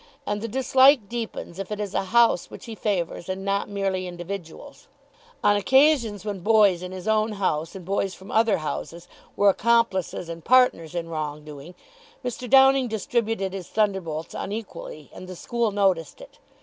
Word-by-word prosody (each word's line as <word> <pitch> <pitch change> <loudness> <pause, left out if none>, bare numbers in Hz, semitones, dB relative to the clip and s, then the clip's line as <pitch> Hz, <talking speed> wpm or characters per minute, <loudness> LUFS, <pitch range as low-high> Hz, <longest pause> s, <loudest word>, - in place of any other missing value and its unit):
And 205 0 -2
the 230 - -3
dislike 260 0 +4
deepens 225 -6 -6
if 195 +1 -6
it 210 - -3
is 205 -2 -4
a - - -1
house 230 -3 +3
which - - -11
he 230 - -7
favours 190 -5 -3
and 190 +1 -4
not 200 +1 -1
merely 195 -2 -2
individuals. 180 - -8 0.6
On 205 - +4
occasions 235 -2 +3
when 205 -2 -4
boys 205 -2 +4
in 180 0 -6
his 185 0 -8
own 215 0 +1
house 165 -4 -2
and 185 -3 -9
boys 195 0 -1
from 190 +2 -12
other 225 0 +3
houses 170 +2 -6 0.3
were 200 0 +4
accomplices 210 -5 +1
and 165 -1 -8
partners 245 -10 +3
in 170 -1 -3
wrong 150 -2 -5
doing, 150 +4 -11 0.5
Mr. 245 0 -5
Downing 270 -1 +6
distributed 220 -2 -2
his 190 -3 -6
thunderbolts 190 -7 -2
unequally, 195 - -7
and 185 - -10
the 185 - -8
school 235 +4 -1
noticed 195 - 0
it. - - -14
200 Hz, 170 wpm, -24 LUFS, 180-230 Hz, 0.6 s, Downing